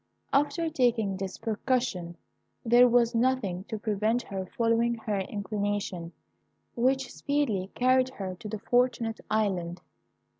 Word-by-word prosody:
After 295 Hz, +4 st, +2 dB
taking 240 Hz, -9 st, +1 dB
this 190 Hz, -1 st, -5 dB
precaution, 225 Hz, -6 st, -1 dB, 0.5 s
there 240 Hz, +2 st, +7 dB
was 240 Hz, 0 st, +3 dB
nothing 230 Hz, -7 st, 0 dB
to 220 Hz, -, -4 dB
prevent 215 Hz, +3 st, 0 dB
her 190 Hz, -2 st, -5 dB
following 230 Hz, +2 st, +1 dB
her 215 Hz, -3 st, -2 dB
inclination, 200 Hz, -3 st, -3 dB, 0.6 s
which 260 Hz, +1 st, +1 dB
speedily 250 Hz, -10 st, -1 dB
carried 255 Hz, +1 st, +3 dB
her 190 Hz, -2 st, -4 dB
to 220 Hz, -, -7 dB
the 215 Hz, -, -3 dB
Fortunate 235 Hz, 0 st, +1 dB
Island. 185 Hz, -5 st, 0 dB
225 Hz, 120 wpm, -28 LUFS, 200-245 Hz, 0.6 s, there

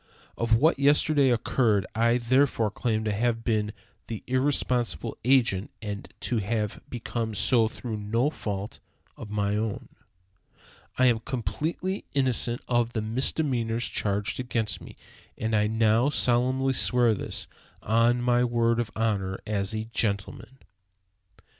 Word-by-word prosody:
Of 115 Hz, -1 st, +2 dB
what 145 Hz, +5 st, +3 dB
yesterday 145 Hz, 0 st, +4 dB
occurred 115 Hz, -4 st, +2 dB
I 115 Hz, +2 st, +3 dB
therefore 125 Hz, -2 st, +2 dB
claim 110 Hz, 0 st, -1 dB
to 110 Hz, -, -1 dB
have 115 Hz, +2 st, 0 dB
been 105 Hz, -3 st, 0 dB, 0.4 s
the 110 Hz, -3 st, -6 dB
irresponsible 125 Hz, -, 0 dB
agent, 120 Hz, -6 st, +3 dB
and 105 Hz, -2 st, -6 dB
to 120 Hz, -, -1 dB
have 105 Hz, 0 st, -2 dB
become 115 Hz, -2 st, -4 dB
so 115 Hz, +2 st, +3 dB
through 110 Hz, 0 st, -6 dB
no 115 Hz, +7 st, 0 dB
fault 100 Hz, -6 st, -5 dB, 0.4 s
of -, -, -9 dB
my 105 Hz, -1 st, 0 dB
own. 110 Hz, -1 st, -3 dB, 1.1 s
I 130 Hz, -, +4 dB
am 120 Hz, -3 st, +4 dB
completely 155 Hz, -, -3 dB
innocent 125 Hz, -3 st, 0 dB
of 120 Hz, -1 st, +1 dB
the 110 Hz, -, -1 dB
misdemeanors 120 Hz, 0 st, 0 dB
charged 100 Hz, +2 st, -1 dB
against 115 Hz, -3 st, -2 dB
me, -, -, -11 dB, 0.4 s
and 110 Hz, 0 st, -1 dB
I 105 Hz, 0 st, +3 dB
now 110 Hz, +4 st, +3 dB
solemnly 130 Hz, 0 st, +2 dB
swear 120 Hz, -2 st, +3 dB
this, 105 Hz, -, -4 dB, 0.4 s
on 115 Hz, +3 st, +2 dB
my 120 Hz, 0 st, +3 dB
word 115 Hz, -1 st, +1 dB
of 120 Hz, -2 st, -1 dB
honor 100 Hz, -4 st, -1 dB
as 105 Hz, 0 st, -2 dB
a 110 Hz, 0 st, -3 dB
gentleman." 110 Hz, +4 st, -2 dB
115 Hz, 135 wpm, -27 LUFS, 110-125 Hz, 1.1 s, yesterday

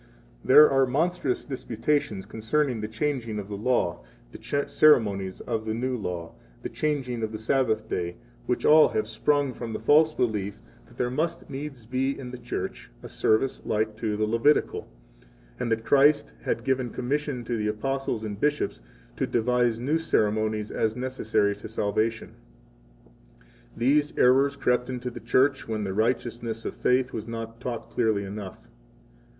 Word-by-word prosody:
61 -, -, -14 dB
There 150 Hz, +3 st, +8 dB
are 135 Hz, -1 st, +4 dB
monstrous 150 Hz, 0 st, 0 dB
disputations 120 Hz, -5 st, -2 dB
concerning 115 Hz, +4 st, -1 dB
the 105 Hz, -, -3 dB
changing 115 Hz, -1 st, -2 dB
of 100 Hz, -1 st, -6 dB
the 100 Hz, -, -4 dB
law, 105 Hz, -, 0 dB, 0.3 s
the 140 Hz, -, -2 dB
ceremonies 100 Hz, -10 st, +3 dB
of 115 Hz, -2 st, -3 dB
the 110 Hz, 0 st, -2 dB
new 125 Hz, +2 st, -1 dB
law, 90 Hz, -7 st, -5 dB, 0.3 s
the -, -, -3 dB
changing 135 Hz, -6 st, -2 dB
of 110 Hz, -1 st, -2 dB
the 110 Hz, -, -4 dB
Sabbath 110 Hz, -1 st, 0 dB
day, 85 Hz, -3 st, -3 dB, 0.3 s
which -, -, -1 dB
all 155 Hz, 0 st, +7 dB
have 110 Hz, 0 st, -1 dB
sprung 140 Hz, +4 st, +1 dB
from 115 Hz, -2 st, -6 dB
the -, -, -3 dB
false 155 Hz, +2 st, +5 dB
belief 105 Hz, -8 st, -2 dB, 0.3 s
that -, -, -19 dB
there 125 Hz, 0 st, 0 dB
must 165 Hz, +5 st, -2 dB
needs 135 Hz, -4 st, -6 dB
be 130 Hz, +3 st, -1 dB
in 125 Hz, -2 st, -7 dB
the 125 Hz, -, -8 dB
Church -, -, -5 dB
a -, -, -7 dB
service 120 Hz, +5 st, +1 dB
like 110 Hz, 0 st, -1 dB
to 110 Hz, -2 st, -2 dB
the 110 Hz, -, +1 dB
Levitical, 115 Hz, +7 st, +2 dB, 0.7 s
and 120 Hz, -2 st, -2 dB
that 115 Hz, 0 st, 0 dB
Christ 145 Hz, -, +4 dB
had -, -, -2 dB
given 130 Hz, -2 st, 0 dB
commission 135 Hz, +1 st, -2 dB
to 120 Hz, +1 st, -2 dB
the 105 Hz, -1 st, -1 dB
Apostles 125 Hz, +1 st, -2 dB
and 105 Hz, -2 st, -5 dB
bishops 150 Hz, -, 0 dB, 0.4 s
to -, -, 0 dB
devise 120 Hz, 0 st, +1 dB
new 145 Hz, +7 st, 0 dB
ceremonies 110 Hz, -6 st, 0 dB
as 110 Hz, 0 st, 0 dB
necessary 125 Hz, -5 st, 0 dB
to 100 Hz, -, -9 dB
62 -, -, -15 dB
salvation. 110 Hz, +2 st, -1 dB, 1.4 s
These 145 Hz, +5 st, +2 dB
errors 135 Hz, +3 st, +4 dB
crept 125 Hz, -2 st, +1 dB
into 125 Hz, -1 st, -4 dB
the 120 Hz, -, -8 dB
Church 130 Hz, +4 st, +2 dB
when 110 Hz, -2 st, -2 dB
the 95 Hz, -2 st, -3 dB
righteousness 115 Hz, +1 st, -1 dB
of -, -, -3 dB
faith 125 Hz, +1 st, +1 dB
was 110 Hz, 0 st, -5 dB
not 115 Hz, 0 st, -6 dB
taught 120 Hz, -2 st, -5 dB
clearly 110 Hz, -4 st, +1 dB
enough. 100 Hz, -1 st, -8 dB
120 Hz, 165 wpm, -26 LUFS, 110-135 Hz, 1.4 s, There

